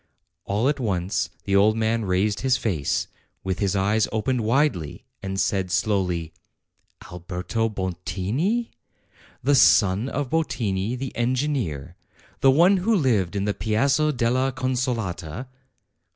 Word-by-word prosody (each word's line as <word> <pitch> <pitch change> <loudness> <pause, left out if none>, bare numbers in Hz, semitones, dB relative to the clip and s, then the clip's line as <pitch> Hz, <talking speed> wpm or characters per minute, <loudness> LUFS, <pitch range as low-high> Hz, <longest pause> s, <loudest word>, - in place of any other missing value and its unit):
All 105 +6 0
at 145 0 0
once 95 -5 -1
the 100 - 0
old 105 +3 +4
man 115 0 0
raised 95 +2 +1
his 130 -1 +2
face, 85 - -1 0.4
with 95 -1 -2
his 100 -1 0
eyes 105 +3 +2
opened 115 +3 0
widely, 110 - 0 0.2
and 95 0 -3
said 95 -1 0
slowly: 90 -4 0 0.8
"Alberto 90 +6 -3
Bottini? 105 - -2 0.7
the 145 +3 +3
son 105 -3 +4
of 145 -1 -3
Bottini, 115 -9 -1
the 135 0 -6
engineer? 120 - -1 0.4
the 135 - +5
one 175 +8 +5
who 215 +5 +1
lived 110 - +1
in 100 0 -1
the 105 - 0
Piazza 135 +9 +1
della 130 +1 +1
Consolata?" 120 -7 -3
110 Hz, 125 wpm, -24 LUFS, 95-130 Hz, 0.8 s, the